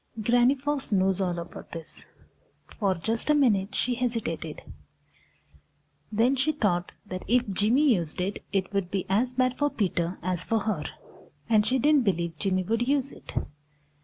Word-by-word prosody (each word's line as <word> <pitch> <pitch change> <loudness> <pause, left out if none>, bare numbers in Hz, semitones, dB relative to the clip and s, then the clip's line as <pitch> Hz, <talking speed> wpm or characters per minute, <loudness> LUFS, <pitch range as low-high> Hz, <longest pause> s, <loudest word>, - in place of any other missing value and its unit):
Granny 245 +4 +4
Fox 280 -1 -3
knows 190 -1 +2
all 180 -2 0
about 170 - -8
this. 165 -2 -7 0.7
For 195 -4 +2
just 220 - 0
a 300 - +5
minute 210 -9 +2
she 250 - +1
hesitated. 230 -11 -3 1.5
Then 230 +5 +3
she 275 +4 +1
thought 180 -10 0
that 185 -2 -6
if 245 +3 +3
Jimmy 245 +8 +3
used 170 -6 -3
it, 190 +3 -2
it 195 0 -1
would 195 -3 0
be 190 -1 -2
as 240 +6 +1
bad 255 0 +1
for 290 0 +3
Peter 180 -6 -1
as 180 -1 -1
for 225 -1 0
her, 195 -8 -2 0.6
and 215 -2 +3
she 260 - +2
didn't 290 +1 +4
believe 170 -4 -1
Jimmy 185 -1 +1
would 230 +5 0
use 275 -1 +1
it. - - -12
210 Hz, 160 wpm, -27 LUFS, 185-250 Hz, 1.5 s, a